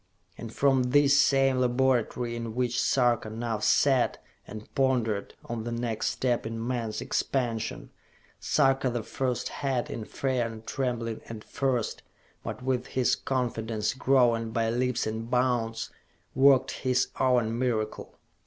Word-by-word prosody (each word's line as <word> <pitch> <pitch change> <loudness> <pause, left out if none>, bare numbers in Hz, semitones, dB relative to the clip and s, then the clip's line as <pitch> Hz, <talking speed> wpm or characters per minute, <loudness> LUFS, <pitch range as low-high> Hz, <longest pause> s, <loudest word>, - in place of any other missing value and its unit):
And 115 -2 -8
from 135 +1 +3
this 140 +3 +4
same 135 -2 +4
laboratory 125 -1 +1
in 115 -1 -5
which 125 -1 0
Sarka 120 -4 +2
now 115 0 -3
sat 130 +3 +3 0.3
and 110 +1 -9
pondered 120 -6 0
on 115 -2 -4
the 120 - -4
next 115 -2 -2
step 125 -2 0
in 115 +1 -4
man's 115 -4 -2
expansion, 120 -4 -2 0.5
Sarka 135 -1 +2
the 120 -2 -3
First 125 +2 -2
had, 135 -4 -2
in 110 - -5
fear 130 -2 -1
and 110 -1 -10
trembling 120 -4 -2
at 110 -2 -7
first, 130 -5 -1 0.4
but - - -6
with 130 -1 -1
his 130 -2 +1
confidence 115 -4 -2
growing 125 -4 +2
by 115 0 0
leaps 125 +1 0
and 110 +1 -4
bounds, 120 -3 0 0.4
worked 135 -1 +5
his 125 -1 +1
own 120 -3 +2
miracle. 110 -4 -2
120 Hz, 135 wpm, -28 LUFS, 115-130 Hz, 0.5 s, worked